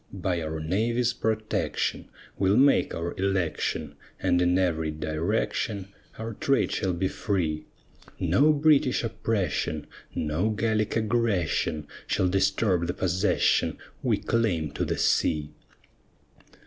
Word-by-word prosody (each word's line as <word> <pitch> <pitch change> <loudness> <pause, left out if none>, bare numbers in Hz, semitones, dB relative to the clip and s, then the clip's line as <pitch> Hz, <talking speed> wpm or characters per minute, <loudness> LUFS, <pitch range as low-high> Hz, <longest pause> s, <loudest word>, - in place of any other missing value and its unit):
By 90 -3 -2
our 80 0 -3
navy's 115 +9 0
protection 110 -1 -1 0.3
We'll 95 +1 +2
make 140 +1 +4
our 85 +1 -3
election, 95 -4 -1 0.3
And 90 - +2
in 90 +1 +3
every 80 -4 +1
direction 85 +6 -2 0.3
Our 115 +1 -5
trade 135 +5 +1
shall 95 -2 0
be 95 +2 0
free; 80 -7 -2 0.5
No 150 +3 +4
British 145 -4 +3
oppression, 105 -9 -1 0.3
No 80 +7 0
Gallic 110 0 0
aggression 105 -9 0 0.2
Shall 95 - +1
disturb 95 -2 +1
the 90 - -2
possession 95 0 +1 0.2
We - - +2
claim 90 -10 0
to - - -2
the - - -2
sea. 75 -1 +1
95 Hz, 115 wpm, -27 LUFS, 85-110 Hz, 0.5 s, make